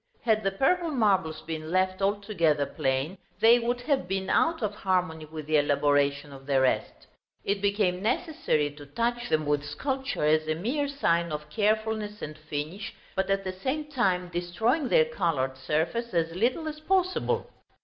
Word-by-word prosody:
Had 220 -2 +3
the 195 - +2
purple 330 - +1
marbles 190 - +1
been 160 -1 -5
left 185 +1 +1
altogether 195 -7 +1
plain, 135 +8 -2 0.2
they 235 +2 +7
would 245 +1 -1
have 265 - 0
been 190 0 -2
out 325 -6 +2
of 210 -1 0
harmony 180 -6 -1
with 155 -1 -8
the 155 0 +3
elaboration 145 0 +2
of 135 0 -12
the 135 -2 +3
rest. 130 -1 0 0.4
It 200 0 -1
became 200 -3 +1
necessary 240 - 0
to 145 0 -12
touch 240 +9 -1
them 155 0 +1
with 145 -1 +1
sculpture 265 - -2
as 155 +1 +3
a 155 - +1
mere 255 - -1
sign 170 - +1
of 150 0 -5
carefulness 215 -1 0
and 155 - -5
finish, 155 +5 -5 0.2
but 190 0 0
at 195 0 +1
the 185 -1 -3
same 295 +10 -3
time 185 -9 +1
destroying 180 - 0
their 475 -1 +5
colored 140 - -1
surface 165 - -1
as 165 -1 +1
little 250 - 0
as 305 0 -5
possible. 370 +3 0
190 Hz, 170 wpm, -27 LUFS, 155-235 Hz, 0.4 s, they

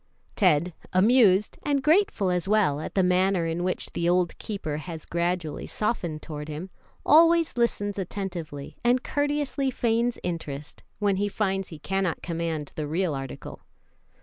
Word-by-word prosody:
Ted, 175 -3 +3 0.2
amused, 205 0 +4
and 280 -2 0
grateful 315 - +3
as 180 +1 -1
well 200 -9 +3
at - - -7
the 190 - +4
manner 180 0 +2
in 165 +1 -2
which 185 0 -1
the 170 0 0
old 180 -1 +2
keeper 175 -8 -4
has 160 0 -7
gradually 170 -2 -2
softened 175 -8 -2
toward 150 -1 -6
him, 155 +5 -6 0.3
always 335 +1 +5
listens 205 -4 0
attentively, 175 -7 -5
and 245 +1 +3
courteously 290 -1 0
feigns 235 -1 0
interest, 150 -4 -5 0.2
when 200 -1 +1
he 205 +1 +1
finds 195 -2 -1
he 160 - -9
cannot 190 +1 -2
command 165 -3 -3
the 155 -1 -4
real 165 +1 0
article. 135 -1 -7
185 Hz, 150 wpm, -26 LUFS, 165-215 Hz, 0.3 s, always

